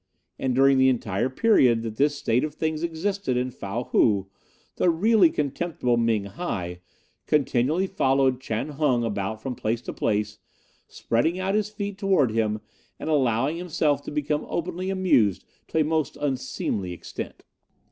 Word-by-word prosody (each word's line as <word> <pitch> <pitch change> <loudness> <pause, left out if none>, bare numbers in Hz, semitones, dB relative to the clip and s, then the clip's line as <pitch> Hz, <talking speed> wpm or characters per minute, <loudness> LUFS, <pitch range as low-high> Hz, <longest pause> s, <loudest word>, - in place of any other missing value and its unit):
And 130 -2 0
during 135 0 +5
the 130 0 +6
entire 115 -1 0
period 130 - +3
that 110 -1 -5
this 145 +1 +2
state 125 -3 +1
of 155 - -3
things 160 -1 -2
existed 170 -3 -1
in 125 +1 -1
Fow 115 +1 -4
Hou 100 -3 +2 0.5
the 180 - +3
really 190 +2 +4
contemptible 145 -4 -1
Ming 115 -3 +1
hi 95 - -4 0.5
continually 150 +4 +2
followed 135 -7 +1
Chan 115 +3 -3
Hung 140 -5 +1
about 105 0 -3
from 130 - -3
place 115 -1 -2
to - - -5
place, 105 -1 -1 0.5
spreading 160 +11 0
out 190 +1 -1
his 210 0 +1
feet 205 -2 -5
towards 180 - +2
him, 110 -1 0 0.4
and 160 - -3
allowing 135 +1 +1
himself 160 -4 0
to - - -4
become 150 0 -2
openly 180 +2 -3
amused 180 - +2 0.2
to - - -3
a - - +4
most 155 0 -1
unseemly 130 -9 -2
extent. 85 - -8
135 Hz, 155 wpm, -25 LUFS, 115-165 Hz, 0.5 s, the